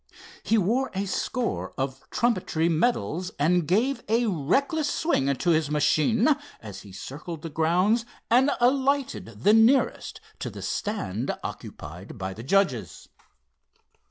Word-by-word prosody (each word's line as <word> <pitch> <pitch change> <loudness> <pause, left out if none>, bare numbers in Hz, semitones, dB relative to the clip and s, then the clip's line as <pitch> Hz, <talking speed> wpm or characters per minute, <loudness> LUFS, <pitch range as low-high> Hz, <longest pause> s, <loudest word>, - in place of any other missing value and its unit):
He 225 - +2
wore 230 +7 +1
a 195 +1 -1
score 235 +5 -2
of 135 0 -4
trumpetry 185 -8 +1
medals, 180 0 0
and 170 +2 +2
gave 240 +10 +1
a 230 +2 +3
reckless 270 - +1
swing 140 - +1
to 175 +6 +1
his 155 -2 +2
machine 155 - +2 0.3
as 100 -3 -9
he 100 - -13
circled 150 - -8
the 165 - -6
grounds 180 +9 +2 0.2
and 255 +4 +4
alighted 265 - 0
the 210 - +6
nearest 225 +5 +3 0.2
to - - -4
the - - -9
stand 130 - -3
occupied 85 +9 -8
by 95 -1 -4
the 110 - -9
judges. 145 - 0
180 Hz, 130 wpm, -26 LUFS, 140-235 Hz, 0.3 s, the